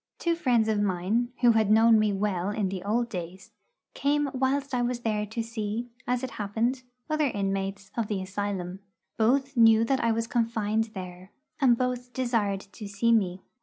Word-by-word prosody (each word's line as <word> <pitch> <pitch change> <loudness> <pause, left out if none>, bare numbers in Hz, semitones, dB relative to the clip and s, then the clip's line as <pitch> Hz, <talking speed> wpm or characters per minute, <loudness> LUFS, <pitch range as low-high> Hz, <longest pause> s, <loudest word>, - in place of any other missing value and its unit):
Two 340 - 0
friends 245 -9 +2
of 215 -2 +1
mine, 205 +5 0
who 240 -1 +6
had 220 -2 +2
known 225 +1 +6
me 215 -1 +2
well 195 -2 -1
in 205 -2 -1
old 230 +4 0
days, 185 -3 -7 0.4
came 290 0 0
whilst 270 +1 0
I 245 - +1
was 240 0 -1
there 210 -2 -1
to 225 +2 -3
see, 225 +1 -4 0.2
as 250 +1 0
it 260 - -4
happened, 230 +6 -1 0.3
other 310 -1 +1
inmates 195 -2 -3
of 230 -3 -1
the 205 -2 -2
asylum. 190 -1 -4 0.4
Both 270 +5 +2
knew 225 -1 +6
that 265 +1 0
I 230 - +3
was 225 0 0
confined 225 -2 0
there, 185 0 -8 0.3
and 250 -5 +4
both 250 0 -2
desired 225 -6 0
to 205 +2 -10
see 200 +4 +1
me. 190 -5 +1
220 Hz, 175 wpm, -27 LUFS, 200-245 Hz, 0.4 s, who